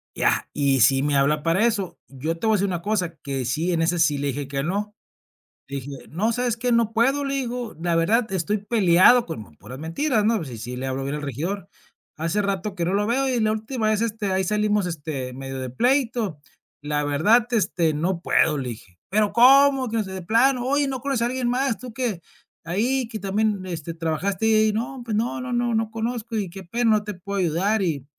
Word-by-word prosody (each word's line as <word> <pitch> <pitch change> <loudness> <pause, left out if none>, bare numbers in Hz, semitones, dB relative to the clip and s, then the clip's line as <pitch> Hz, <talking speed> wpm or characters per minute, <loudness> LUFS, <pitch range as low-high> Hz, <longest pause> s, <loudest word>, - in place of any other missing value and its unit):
ya, - - +1
y 140 -3 +2
si 135 +3 +5
me 145 0 +1
habla 145 +2 +2
para 170 +7 +2
eso. 200 -7 -1
Yo 150 +5 -4
te 195 - -5
voy 220 -1 +4
a - - +2
decir 200 +1 +1
una 175 -3 -3
cosa 185 -4 -1
que 135 -2 -3
sí 155 +8 0
en 165 -2 +1
ese 170 +1 +1
sí 150 -3 +3
le 140 +1 -2
dije 140 0 -3
que 135 0 -2
no. 205 +6 -2 0.7
Dije: 140 0 -6 0.2
"No, 205 +9 0
sé, 245 +2 -1
es 235 -1 -1
que 245 +1 -1
no 230 -1 +2
puedo", 270 +5 +2
le 275 - -2
digo. 245 -3 -3
"La 170 -1 +1
verdad, 215 +7 +2
estoy 190 +3 0
peleado", 205 +2 +5
con 110 - -8
puras 125 - -10
mentiras, 215 - 0
¿no? 220 -5 +2
Sí, 125 -4 -8
sí 120 +3 -6
le 130 +1 -4
hablo 130 +1 -2
bien 140 +2 -3
al 150 - -5
regidor. 160 - -4 0.5
"Hace 165 +6 -1
rato 200 0 -2
que 175 -3 -1
no 180 - 0
lo 205 +1 +1
veo. 265 +4 +1
Y 255 -2 0
la 215 0 +2
última 220 +1 -2
vez, 215 0 +1
este, 220 -3 -2
ahí 190 0 +1
salimos, 210 0 +1
este, 145 -6 -4
medio 135 0 -6
de 130 -1 -4
pleito. 235 - 0 0.4
La 150 0 -1
verdad, 205 +12 +3
este, 175 -8 +1
no 170 +4 -1
puedo", 155 -3 +2
le 130 -3 -3
dije. 100 -6 -11
Pero, 205 0 +1
como 265 +2 +6
que 230 - -2
no 220 - +1
sé 190 - -8
de 190 - -5
plano. 245 +7 +2
"Oye, 285 +2 +2
¿no 260 -2 -4
conoces 270 -3 -1
a - - +2
alguien 250 0 -1
más? 255 -2 0
Tú 250 0 -9
que 230 -8 -2 0.4
ahí 230 +10 0
que 220 -2 -5
también, 205 0 0
este, 170 -2 -5
trabajaste 170 +5 -2
ahí". 215 -1 +4
"No, 245 +4 -3
pues 225 -3 -3
no, 240 +2 -1
no, 255 0 -5
no, 240 -1 0
no 220 0 -1
conozco 230 0 -3
y 200 -4 -2
qué 190 +2 -9
pena, 230 +6 +1
no 210 -1 +3
te 210 0 -5
puedo 200 +2 -5
ayudar 190 +5 +1
y 155 -8 -1
200 Hz, 230 wpm, -23 LUFS, 160-230 Hz, 0.7 s, como